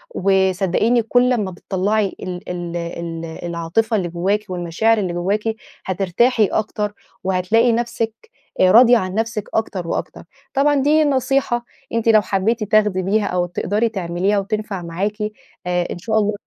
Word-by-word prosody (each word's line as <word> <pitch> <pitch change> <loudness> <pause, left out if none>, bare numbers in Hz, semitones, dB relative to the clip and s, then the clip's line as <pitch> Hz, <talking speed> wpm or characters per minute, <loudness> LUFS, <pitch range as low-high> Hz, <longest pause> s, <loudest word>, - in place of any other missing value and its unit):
وصدقيني 190 +4 +2
كل 245 +3 +3
لما 215 -7 0
بتطلّعي 195 +3 -1
ال 180 -1 -6
ال 175 -1 -4
ال 170 -1 -5 0.2
العاطفة 175 +7 -1
اللي 180 - -1
جواكِ 195 +5 -1
والمشاعر 180 +6 +1
اللي 185 -4 -1
جواكِ 195 +5 -1 0.4
هترتاحي 200 +5 +2
أكتر، 210 0 -2 0.3
وهتلاقي 190 +6 +2
نفسِك 230 -1 -1 0.5
آآ 185 0 +5
راضية 240 +3 +7
عن 185 -3 -3
نفسِك 225 -1 -2
أكتر 195 -6 -2
وأكتر. - - -4 0.3
طبعًا 290 +2 +3
دي 295 +3 +3
نصيحة 265 -3 +1 0.3
أنتِ 230 0 -1
لو 215 -1 +6
حبيتِ 205 +4 0
تاخدي 210 -2 +2
بيها 205 +3 +1
أو 180 0 0
تقدري 205 +6 -1
تعمليها 190 0 0
وتنفع 210 -1 -3
معاكِ، 185 +5 -3 0.5
آآ 180 -1 0
إن - - -4
شاء 220 +4 -1
الله 210 0 +1
205 Hz, 145 wpm, -20 LUFS, 180-225 Hz, 0.5 s, راضية